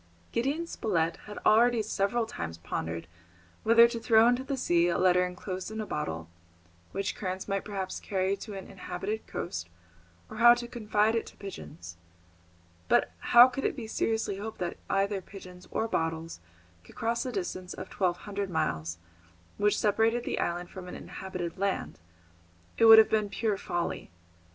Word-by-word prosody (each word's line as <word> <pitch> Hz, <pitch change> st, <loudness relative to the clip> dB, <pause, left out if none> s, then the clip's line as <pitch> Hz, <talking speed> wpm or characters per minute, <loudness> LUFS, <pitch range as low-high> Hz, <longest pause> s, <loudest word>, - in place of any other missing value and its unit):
Gideon 280 Hz, +8 st, 0 dB
Spilett 170 Hz, -, -1 dB
had 210 Hz, -, -8 dB
already 235 Hz, +1 st, +5 dB
several 215 Hz, +2 st, 0 dB
times 85 Hz, -, -6 dB
pondered 85 Hz, 0 st, -4 dB, 0.6 s
whether 230 Hz, +1 st, +7 dB
to 235 Hz, 0 st, -4 dB
throw 225 Hz, 0 st, +5 dB
into 245 Hz, +2 st, +2 dB
the 270 Hz, 0 st, -3 dB
sea 175 Hz, -8 st, +2 dB
a 175 Hz, -, +1 dB
letter 180 Hz, 0 st, +4 dB
enclosed 185 Hz, +1 st, -5 dB
in 220 Hz, 0 st, -6 dB
a 215 Hz, -, -2 dB
bottle, 80 Hz, -, -4 dB, 0.6 s
which 195 Hz, 0 st, -2 dB
currents 185 Hz, -1 st, -4 dB
might 195 Hz, -1 st, -1 dB
perhaps 195 Hz, -3 st, -4 dB
carry 190 Hz, 0 st, 0 dB
to 210 Hz, -1 st, -8 dB
an 195 Hz, -, -7 dB
inhabited 195 Hz, +3 st, -5 dB
coast, 85 Hz, -, -5 dB, 0.6 s
or 235 Hz, +2 st, +6 dB
to 240 Hz, 0 st, -5 dB
confide 220 Hz, -2 st, +1 dB
it 230 Hz, -, -1 dB
to -, -, -13 dB
pigeons. 160 Hz, -, -9 dB, 0.9 s
But -, -, +3 dB
how 240 Hz, +1 st, +8 dB
could 260 Hz, +1 st, -5 dB
it -, -, 0 dB
be 245 Hz, -5 st, -6 dB
seriously 220 Hz, -2 st, -1 dB
hoped 220 Hz, +2 st, -6 dB
that 175 Hz, -1 st, -3 dB
either 195 Hz, 0 st, +1 dB
pigeons 180 Hz, -1 st, -12 dB
or 225 Hz, -, -1 dB
bottles 160 Hz, -, -2 dB, 0.4 s
could -, -, -17 dB
cross 230 Hz, +1 st, -1 dB
the 255 Hz, -, -3 dB
distance 185 Hz, -3 st, -4 dB
of 185 Hz, -, -8 dB
twelve 180 Hz, -3 st, 0 dB
hundred 200 Hz, -1 st, -3 dB
miles 85 Hz, -, -1 dB, 0.6 s
which 205 Hz, 0 st, +2 dB
separated 225 Hz, +3 st, +2 dB
the -, -, -2 dB
island 175 Hz, +1 st, -2 dB
from 185 Hz, -1 st, -8 dB
any -, -, -7 dB
inhabited 180 Hz, -2 st, -6 dB
land? 195 Hz, -, -2 dB, 0.8 s
It 230 Hz, -, +4 dB
would 225 Hz, 0 st, +11 dB
have 220 Hz, -, +7 dB
been 215 Hz, -2 st, +1 dB
pure 215 Hz, 0 st, 0 dB
folly. 175 Hz, -3 st, -3 dB
200 Hz, 165 wpm, -29 LUFS, 180-225 Hz, 0.9 s, would